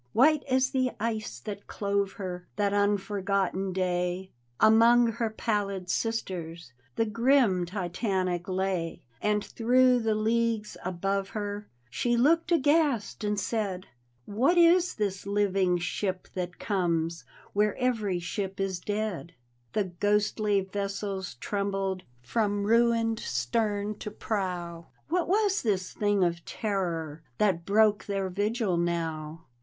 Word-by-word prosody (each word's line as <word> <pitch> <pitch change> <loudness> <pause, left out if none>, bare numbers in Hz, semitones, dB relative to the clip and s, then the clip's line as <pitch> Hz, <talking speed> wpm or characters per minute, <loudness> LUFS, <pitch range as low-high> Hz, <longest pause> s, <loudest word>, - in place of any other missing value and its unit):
White 300 +5 +5
as 260 +1 +2
the 260 -2 +1
ice 215 - -3
that 200 +6 -7
clove 200 -1 -1
her 180 -3 -6
That 200 -1 +1
unforgotten 200 -1 0
day, 180 0 -1 0.3
Among 230 +2 +6
her 230 0 -1
pallid 200 -4 -2
sisters 170 - -3 0.2
The 225 - +2
grim 230 -5 +3
Titanic 185 -1 -2
lay. 185 -3 -2 0.2
And 210 0 +1
through 250 +2 +3
the 225 -2 +1
leagues 225 0 0
above 195 +2 -1
her 205 0 -4 0.2
She 240 - +1
looked 330 +7 +3
aghast 290 -9 +2
and 210 -1 0
said: 195 -4 -2 0.2
" 120 0 -41 0.2
What 345 +7 +4
is 345 +1 +5
this 200 -3 -2
living 195 -3 +2
ship 185 +2 -3
that 180 -1 -4
comes 170 -5 -1 0.3
Where 210 0 +2
every 225 -7 0
ship 190 +2 -4
is 195 -2 -1
dead? 205 -4 -3 0.2
" 120 -1 -41
The 210 - +2
ghostly 205 +2 +1
vessels 195 -1 -4
trembled 195 +3 -2 0.2
From 205 - 0
ruined 230 +1 +3
stem 210 -4 -1
to - - -5
prow; 180 -6 -3 0.2
What 350 +1 +1
was 405 +1 +2
this 190 -5 -1
thing 205 -2 +2
of 170 -1 0
terror 170 -7 -3 0.2
That 185 -5 +1
broke 210 0 +3
their 195 -2 -2
vigil 205 0 0
now? 165 -2 -2
200 Hz, 130 wpm, -28 LUFS, 185-225 Hz, 0.3 s, Among